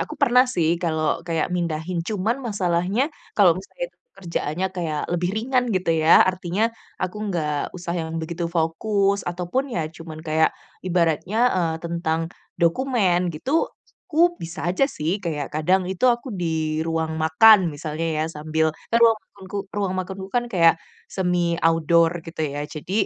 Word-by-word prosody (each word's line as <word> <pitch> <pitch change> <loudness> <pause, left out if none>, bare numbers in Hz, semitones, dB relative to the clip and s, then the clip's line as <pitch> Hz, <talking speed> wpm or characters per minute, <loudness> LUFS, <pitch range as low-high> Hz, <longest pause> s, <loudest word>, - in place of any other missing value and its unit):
aku - - -7
pernah 250 +1 +6
sih 170 -10 +1
kalau 160 -1 0
kayak 165 -2 0
mindahin, 170 0 -2
cuman 210 +5 -1
masalahnya 195 -2 0 0.3
kalau 195 -5 +6
misalnya - - -6 0.3
kerjaannya 170 0 -2
kayak 165 -5 -3
lebih 175 +1 0
ringan 250 +3 +1
gitu 185 -2 0
ya, 160 0 +6
artinya 185 +2 -1 0.4
aku 185 +2 -2
nggak 150 -5 -2
usah 175 -1 -4
yang 160 -1 -4
begitu 170 +1 -3
fokus 195 +5 0
ataupun 175 +9 -1
ya - - 0
cuman 165 -1 -10
kayak 160 0 +2 0.4
ibaratnya, 170 +3 +1 0.2
eee, 165 -3 +1
tentang 170 -1 -1 0.4
dokumen 180 -2 +2
gitu, 165 - -5 0.6
aku 345 +2 +2
bisa 165 +2 -6
aja 185 +9 +2
sih. 180 - -2
Kayak 150 -4 -3
kadang 180 +5 +2
itu 190 +5 -2
aku 240 +3 -10
di 160 -5 -1
ruang 160 -1 -1
makan 180 +8 +7 0.2
misalnya 155 +2 -4 0.2
ya - - 0
sambil 160 +1 0 0.2
kan - - +6
ruang 225 -1 +6
makanku 190 0 -11 0.2
ruang 200 -2 -1
makanku 190 +1 -5
kan 245 +2 +1
kayak 165 -3 +5 0.4
semi 175 -2 0
outdoor 165 0 +4 0.2
gitu 165 -1 -7
ya, 145 - -3
jadi 155 +4 -7
175 Hz, 150 wpm, -23 LUFS, 160-195 Hz, 0.6 s, makan